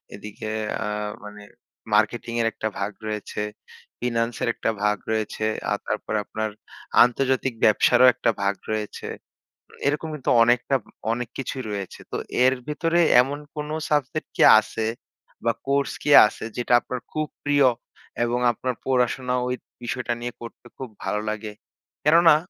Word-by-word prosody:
এদিকে 105 +1 -7 0.3
আ 105 - -3 0.4
মানে 105 0 -10 0.5
মার্কেটিংয়ের 115 +2 +1
একটা 110 - -3
ভাগ 100 +1 -1 0.2
রয়েছে, 105 -1 -4 0.6
ফিন্যান্সের 115 0 -1
একটা - - -2
ভাগ 105 0 +2
রয়েছে 110 0 -1 0.3
আর - - +2
তারপরে 110 - -2
আপনার 110 0 -3 0.5
আন্তর্জাতিক 130 +1 +1
ব্যবসারও 120 +4 +5
একটা - - 0
ভাগ 100 0 +1 0.2
রয়েছে। 110 -1 -4 0.6
উম - - -17
এরকম 150 +3 0
কিন্তু 145 - -3
অনেকটা 120 +3 +2
উম - - -20 0.2
অনেক 120 0 -3
কিছুই 135 -1 -4
রয়েছে। 100 -2 -5
তো - - -2 0.3
এর 130 +1 +5
ভেতরে 165 +3 +1 0.2
এমন 140 +3 -3 0.2
কোনো 150 0 -4 0.2
সাবজেক্ট 150 +1 -1
কি - - -1 0.2
আছে 110 +1 -4 0.6
বা 115 - +4 0.2
কোর্স 140 0 +1
কি - - -1 0.2
আছে 110 - -9
যেটা 120 0 0
আপনার 125 - -5
খুব 155 0 -2 0.2
প্রিয়? 145 -1 +4 0.6
এবং 120 +1 0
আপনার 125 +1 -3
পড়াশোনা 125 0 +1
ওই 125 - -1 0.3
বিষয়টা 120 0 -2
নিয়ে 120 0 -4
করতে 115 +1 -10
খুব 130 -2 -6
ভালো 105 - -1
লাগে? 110 0 -4 0.5
কেননা 165 +1 +6
120 Hz, 145 wpm, -24 LUFS, 110-135 Hz, 0.6 s, কেননা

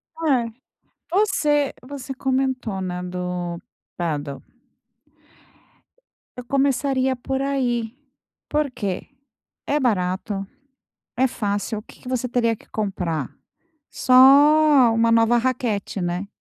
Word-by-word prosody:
Eh, 265 -8 +1 0.6
você 315 -7 +2
você 270 +1 -7
comentou, 260 -6 -1
né, 180 -1 -4
do 180 -1 -4 0.4
pádel 145 -5 -3 1.9
eu 250 - -7
começaria 270 0 +1
por 265 +2 -3
aí. 245 -4 -1 0.5
Por 300 -1 0
que? 200 -6 -4 0.6
É 295 - +1
barato, 195 -4 -1 0.7
é 260 +2 +3
fácil. 210 -1 -2
O - - -13
que - - -17
que 250 - -8
você 255 -1 -1
teria 230 -2 +1
que - - -22
comprar? 180 - -2 0.6
Só 255 - -2 0.8
1 230 0 +3
nova 230 +1 +4
raquete, 235 -5 -1
né? 175 +2 -2
235 Hz, 105 wpm, -22 LUFS, 190-265 Hz, 1.9 s, nova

